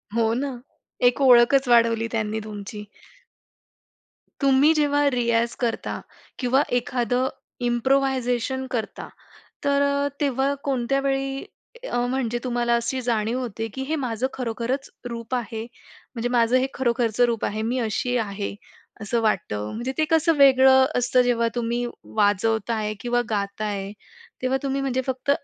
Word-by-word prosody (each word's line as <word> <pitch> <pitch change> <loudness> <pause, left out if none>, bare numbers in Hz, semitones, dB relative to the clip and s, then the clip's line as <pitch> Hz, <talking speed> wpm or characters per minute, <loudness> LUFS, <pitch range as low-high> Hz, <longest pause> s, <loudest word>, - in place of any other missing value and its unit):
हो 225 -1 +2
ना, 275 +4 -1 0.6
एक 250 +3 +1
ओळखच 255 +1 +6
वाढवली 230 -1 +4
त्यांनी 220 -1 -1
तुमची. 210 0 -7 1.6
तुम्ही 275 +3 +5
जेव्हा 290 -1 +2
रियाज 235 -1 +1
करता 235 -3 -2 0.4
किंवा 260 +2 +3 0.2
एखादं 245 +1 0 0.4
इम्प्रोव्हायझेशन 260 0 +1
करता. 225 -4 -4 0.6
तर 280 0 +3 0.4
तेव्हा 275 0 +1
कोणत्या 275 0 0
वेळी 270 0 -1 0.5
अ, - - -2
म्हणजे 245 -2 -1
तुम्हाला 240 -1 +1
अशी 235 +3 -2
जाणीव 230 0 0
होते 225 -2 -4
की 265 - -4
हे 315 - 0
माझं 250 -3 -1
खरोखरच 245 +2 -3 0.2
रूप 235 +1 -5
आहे? 225 -2 -3 0.5
म्हणजे 235 +1 -2
माझं 240 0 +3
हे 255 - +2
खरोखरचं 240 -2 +1
रूप 230 -2 -2
आहे. 215 +1 -2
मी 240 +3 -1
अशी 240 +3 -1
आहे 200 -2 -3 0.5
असं 220 +2 -1
वाटतं. 105 - -1
म्हणजे 240 +4 -3
ते 310 - +4
कसं 325 0 +4
वेगळं 265 -1 +7
असतं 250 +1 +3
जेव्हा 235 -2 +1
तुम्ही 240 0 -1 0.3
वाजवताय 215 +1 +1
किंवा 245 0 +1
गाताय, 200 -1 -2 0.5
तेव्हा 260 +1 +1
तुम्ही 275 0 -1
म्हणजे 260 -1 -1
फक्त 260 +1 -2
245 Hz, 130 wpm, -24 LUFS, 225-265 Hz, 1.6 s, वेगळं